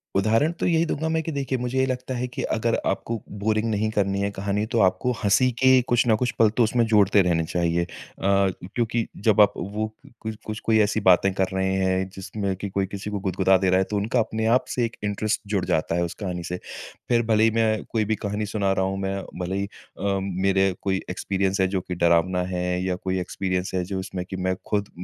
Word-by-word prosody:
उदाहरण 110 +10 +3
तो - - 0
यही 165 -1 +3
दूँगा 160 0 -2
मैं 160 0 +1
कि 165 - -3
देखिए 135 -2 -2
मुझे 125 +1 -3
ये 130 - +4
लगता 130 0 -3
है, 125 +1 -2
कि 125 - -6
अगर 115 +1 0
आपको 115 -2 -2 0.2
बोरिंग 110 +2 +1
नहीं 110 0 0
करनी 100 -2 0
है 100 - 0
कहानी, 100 +1 -2
तो 115 +1 -1
आपको 95 +6 +2
हँसी 105 +6 +4
के 130 -1 +6
कुछ 120 0 +1
ना 110 - +5
कुछ 125 +3 0
पल 110 -2 +6
तो 120 - +5
उसमें 115 +1 +2
जोड़ते 105 -2 +5
रहने 85 -3 +1
चाहिए। 85 +1 0
अ - - -4 0.4
अ, 100 0 +4 0.3
क्योंकि 115 -1 0 0.2
जब 110 -1 +5
आप 100 0 +5
वो 105 +4 -3
कु - - -19
कुछ 110 0 -4
कुछ 110 0 -4
कोई 110 -1 +4
ऐसी 105 +1 +1
बातें 95 0 +5
कर 95 0 +1
रहे 95 0 0
हैं 95 0 +1
जिसमें 95 0 -3
कि 100 +2 -5
कोई 95 0 0
किसी 100 +2 -6
को 105 -1 -3
गुदगुदा 95 0 +3
दे 95 0 +1
रहा 95 - +4
है, - - +3
तो 105 - -5
उनका 110 +5 0
अपने 110 0 -1
आप 130 - +1
से 120 - 0
एक 115 - -6
इंटरेस्ट 105 +2 -1
जुड़ 100 -3 0
जाता 80 +1 0
है 85 - +1
उस 85 - -3
कहानी 90 -3 -3
से। 90 +2 -4 0.5
फिर 120 -1 +4
भले 110 -1 +3
ही 115 - +4
मैं 110 -1 +1
कोई 110 -2 +1
भी 110 +1 0
कहानी 105 +1 -3
सुना 100 -1 0
रहा 95 0 +1
हूँ, 95 0 -2
मैं 95 0 -2 0.2
भले 90 +1 -2
ही 100 - -1
अ, 100 0 -4
मेरे 95 0 +1
कोई 95 -1 0
एक्सपीरियंस 95 +1 -1
है 95 - +3
जो 95 0 -1
कि 90 - -5
डरावना 85 +2 +2
है 90 0 -1 0.2
या 95 -1 0
कोई 95 0 -2
एक्सपीरियंस 90 0 -2
है 90 - 0
जो 95 +1 -3
उसमें 95 -1 -5
कि - - -4
मैं 95 0 -1
खुद 100 -1 -1
100 Hz, 240 wpm, -24 LUFS, 95-110 Hz, 0.5 s, के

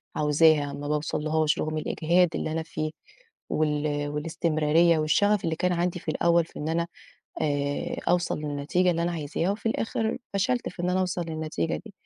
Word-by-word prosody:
عاوزاها 150 -1 +4
ما 145 +1 -5
باوصلهاش 155 +1 0
رغم 155 0 -2
الإجهاد 170 +3 +2
اللي - - -2
أنا 160 +1 -1
فيه 155 -1 -4 0.6
وال 150 -1 0
والاستمرارية 160 +1 +2
والشغف 205 +7 +2
اللي 165 -1 0
كان 180 +2 +1
عَندي 175 +1 -1
في - - -3
الأوّل 170 -1 +3
في - - -11
إن 150 - -3
أنا 170 +1 0 0.5
آآ 145 -1 -1
أوصل 175 -1 +2
للنتيجة 150 +5 0
اللي 170 0 0
أنا 175 - 0
عايزاها 165 +3 -1
وفي 205 - -6
الآخر 225 0 -1 0.2
فشلت 245 +5 0
في 175 - -7
إن 180 - +1
أنا 185 - +1
أوصل 180 -1 -1
للنتيجة 155 - -2
دي؛ - - -13
160 Hz, 170 wpm, -26 LUFS, 150-175 Hz, 0.6 s, عاوزاها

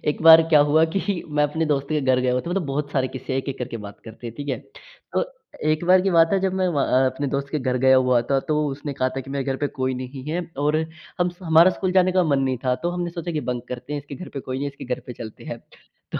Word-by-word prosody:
एक 150 - 0
बार 165 0 +10
क्या 155 -3 +6
हुआ 160 +2 +5
कि 195 -2 -1
मैं 150 -1 +2
अपने 160 +2 -1
दोस्त 140 -2 0
के 155 -1 +1
घर 130 -2 +2
गया 125 0 +1
हुआ 125 - +1
था। 170 - -6
मतलब 185 0 -1
बहुत 145 +1 -2
सारे 130 -2 +1
किस्से 130 0 -6
हैं 130 - +1
एक-एक 135 0 -6
करके 125 -1 -4
बात 100 0 -10
करते 115 +1 -10
हैं 115 - -7
ठीक 145 0 -6
है? 130 - -1 0.6
तो - - +2 0.5
1 155 +2 0
बार 185 +1 +6
की 195 +1 +1
बात 165 -2 +5
है 195 - +4
जब 190 -1 0
मैं 185 - +2
व 145 -5 0
अ, 130 0 +3
अपने 135 +2 -2
दोस्त 140 0 -1
के 155 - +1
घर 130 -2 -1
गया 130 +1 +5
हुआ 125 -2 +4
था 135 - +4
तो 150 - +2
उसने 145 +1 -4
कहा 130 -1 0
था - - -1
कि 135 +1 -10
मेरे 140 -1 -2
घर 135 0 -1
पे - - +3
कोई 130 0 0
नहीं 130 +1 -7
है 170 +3 -1 0.2
और 150 +2 +2 0.4
हम 175 - +3
स 175 - -19
हमारा 165 +1 +6
स्कूल 185 0 -2
जाने 185 0 +4
का 185 - +3
मन 140 -3 +2
नहीं 130 -1 0
था 125 -1 +2
तो 175 - 0
हमने 175 -1 -3
सोचा 170 0 -5
कि 155 - -1
बंक 125 -1 -2
करते 125 +3 -6
हैं 145 - -2
इसके 140 0 -10
घर 180 +5 -8
पे - - -2
कोई 130 0 -5
नहीं 140 - -3
है 140 - -2
इसके 140 - -10
घर - - -13
पे 125 - -6
चलते 115 -2 -10
हैं। - - -6 0.5
तो - - -1
145 Hz, 305 wpm, -23 LUFS, 130-165 Hz, 0.6 s, बार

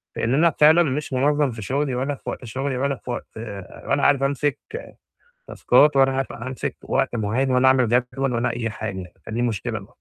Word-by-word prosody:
لإن 115 - 0
أنا 165 +5 +5
فعلًا 155 +3 +7
مش 145 -1 -3
منظَّم 145 +1 +2
في 115 -1 -8
شغلي، 135 +5 -1
ولا 135 +3 -1
في - - -8
وقت - - -6
شغلي، 130 +3 -3
ولا 140 +2 0
في 125 - -13
وقت 120 - -5 0.6
ولا 140 0 +1
عارف 140 -1 +4
أمسِك 140 +1 0 0.9
تاسكات 150 0 +4
ولا 135 0 +5
عارف 135 0 -2
أمسِك 130 0 -5
وقت - - 0
معيّن، 115 +5 0
ولا 125 +1 +4
أعمل 130 -2 +4
جدول 125 +2 0
ولا 120 +1 0
أي 115 -1 -2
حاجة، 95 -5 -6
فدي 115 +2 -3
مشكلة 115 -1 -2
ب 95 - -13
130 Hz, 190 wpm, -23 LUFS, 120-140 Hz, 0.9 s, فعلًا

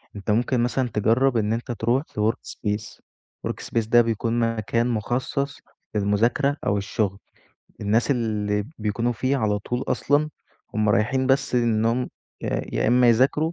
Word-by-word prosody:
أنت 105 +1 -2
ممكن 120 +3 +1
مثلًا 125 +1 0
تجرّب 115 +4 +2
إن 110 0 +1
أنت 115 +2 -3
ترُوح 120 +4 +1
في 105 - -5
work - - -18
space، 105 0 -4 0.5
work - - -5
space 115 -2 -1
ده 120 0 +7
بيكون 115 0 0 0.2
مكان 115 +2 0
مُخصص 125 +5 -2 0.4
للمُذاكرة 115 +8 +2
أو 100 - +2
الشغل 100 -1 -1 0.6
الناس 110 +6 +1
اللي 105 -4 0
بيكونوا 110 +3 0
فيه 130 +4 0
على 105 -4 +1
طول 125 +5 -3
أصلًا 145 +2 +1 0.4
هُم 110 -1 +1
رايحين 115 +6 +2
بس 135 0 +2
إنهُم 115 +1 +2 0.3
ي - - -3 0.3
يا - - +2
إما 125 0 +5
يذاكروا 135 +7 +3
115 Hz, 150 wpm, -24 LUFS, 105-125 Hz, 0.6 s, ده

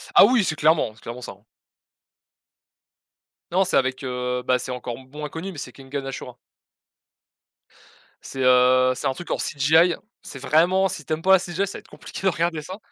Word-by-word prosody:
Ah, - - +10
oui, 245 -4 +3
c'est 160 -3 -1
clairement 155 -5 +2
c'est 110 - -21
clairement 120 +2 -8
ça, 110 - -7
hein - - -32 2.1
non, 190 +2 +3
c'est, 185 - -1
avec, 130 0 0
heu, 125 0 -3
bah, 125 0 +3
c'est 125 +1 -5
encore 125 -1 -5
b 130 +1 -17
moins 150 0 -5
connu 170 +6 -6
mais 175 - -11
c'est 125 -3 -7
Kengan 135 0 -6
Ashura 130 -2 -7 1.9
c'est, 135 - -7
heu, 130 0 +5
c'est 135 - -2
un 135 - 0
truc 175 +6 -8
en - - +1
CGI. 160 +4 +3 0.3
C'est 135 - -9
vraiment, 175 +7 +3
si 165 - -6
tu 155 - -2
aimes 155 - -3
pas 190 - +5
la 190 - +7
CGI, 180 +2 -2
ça 200 - -7
va - - -8
être - - -20
compliqué - - -9
de 195 - +4
regarder 165 -2 -1
ça. 185 +6 -8
145 Hz, 205 wpm, -23 LUFS, 130-170 Hz, 2.1 s, Ah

